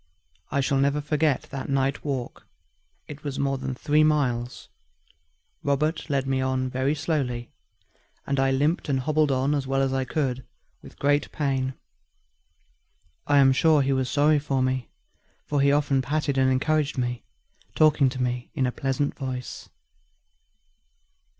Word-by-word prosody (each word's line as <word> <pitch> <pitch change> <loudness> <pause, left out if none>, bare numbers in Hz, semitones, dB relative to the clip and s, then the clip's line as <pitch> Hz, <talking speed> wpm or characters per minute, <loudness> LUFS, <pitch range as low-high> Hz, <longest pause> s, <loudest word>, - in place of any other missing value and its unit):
I 140 - 0
shall 135 0 +1
never 140 +2 +2
forget 150 -1 0
that 140 -1 -5
night 135 0 0
walk; 135 -5 -4 0.6
it 150 0 -10
was 140 -2 -4
more 135 -1 0
than 130 - -4
three 150 +3 +2
miles. 130 -6 0 0.9
Robert 150 +3 -1
led 135 -2 0
me 135 0 0
on 130 -1 -1
very 130 +4 0
slowly, 140 -6 -2 0.7
and 140 -1 -1
I 135 0 +3
limped 145 +5 0
and 135 -2 +1
hobbled 155 +1 +1
on 135 +2 +1
as 140 -2 -1
well 135 0 0
as 135 0 0
I 135 -1 0
could 130 -2 -2 0.4
with - - -14
great 145 +1 +1
pain. 135 -3 -1 1.5
I 145 - +4
am 135 -1 +6
sure 155 +1 +4
he 135 +1 +1
was 130 -1 0
sorry 150 +1 +3
for 135 -2 -1
me, 130 -1 -1 0.6
for 145 -1 0
he 140 0 +4
often 145 -2 +2
patted 145 +1 -1
and 130 -1 +3
encouraged 150 +2 0
me, 125 -1 -2 0.5
talking 150 -3 +4
to 130 0 -7
me 125 0 -3
in 130 - +1
a 125 - 0
pleasant 135 +2 -1
voice. 130 -2 -6
135 Hz, 155 wpm, -25 LUFS, 130-145 Hz, 1.5 s, am